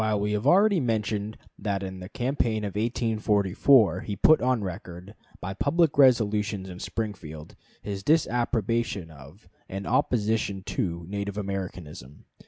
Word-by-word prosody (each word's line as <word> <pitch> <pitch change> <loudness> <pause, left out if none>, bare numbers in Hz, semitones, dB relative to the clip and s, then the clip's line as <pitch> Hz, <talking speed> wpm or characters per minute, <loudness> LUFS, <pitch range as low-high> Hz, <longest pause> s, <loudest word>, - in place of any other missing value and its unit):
We 105 +1 -1
have 105 0 -1
already 200 0 +5
mentioned 110 -4 -2 0.2
that 100 -2 -2
in 95 -1 -6
the 90 +1 -9
campaign 120 -3 -1
of 100 -2 -4
1844 110 0 +2
he 100 - -5
put 155 +10 +5
on 125 -3 +1
record, 90 0 -7 0.3
by 95 +1 -5
public 155 - +1
resolutions 105 -7 +3
in 90 -1 -9
Springfield, 90 -6 -6 0.3
his 100 -2 -4
disapprobation 115 - 0
of, 80 +7 -15 0.2
and 95 +1 -5
opposition 110 -5 0
to, 85 -3 -3
Native 100 +1 -4
Americanism. 90 - -6
105 Hz, 130 wpm, -26 LUFS, 95-115 Hz, 0.3 s, already